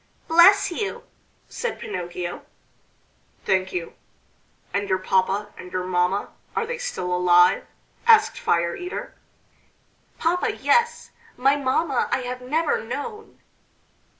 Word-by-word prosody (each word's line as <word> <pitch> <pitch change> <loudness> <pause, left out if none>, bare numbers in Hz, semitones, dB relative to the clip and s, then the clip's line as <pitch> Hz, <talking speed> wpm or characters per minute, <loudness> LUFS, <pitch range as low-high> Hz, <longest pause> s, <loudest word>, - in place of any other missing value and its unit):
"Bless 375 +4 +6
you!" 400 +4 -4 0.4
said 480 -2 -4
Pinocchio. 175 - -5 1.0
"Thank 190 0 +1
you! 170 -2 -4 0.8
And 200 0 -1
your 185 - +2
papa 190 +2 0
and 180 0 -11
your 185 - -2
mamma, 180 +2 0 0.3
are 455 - 0
they 480 +1 -5
still 335 - -3
alive?" 175 0 +4 0.4
asked 440 -2 +5
Fire 170 0 +1
eater. 365 +8 -6 1.0
"Papa, 360 +7 0
yes: 475 0 +1 0.3
my 270 +3 +3
mamma 280 0 0
I - - +1
have 250 0 -5
never 300 +1 0
known." 420 - -7
250 Hz, 115 wpm, -23 LUFS, -, 1.0 s, Bless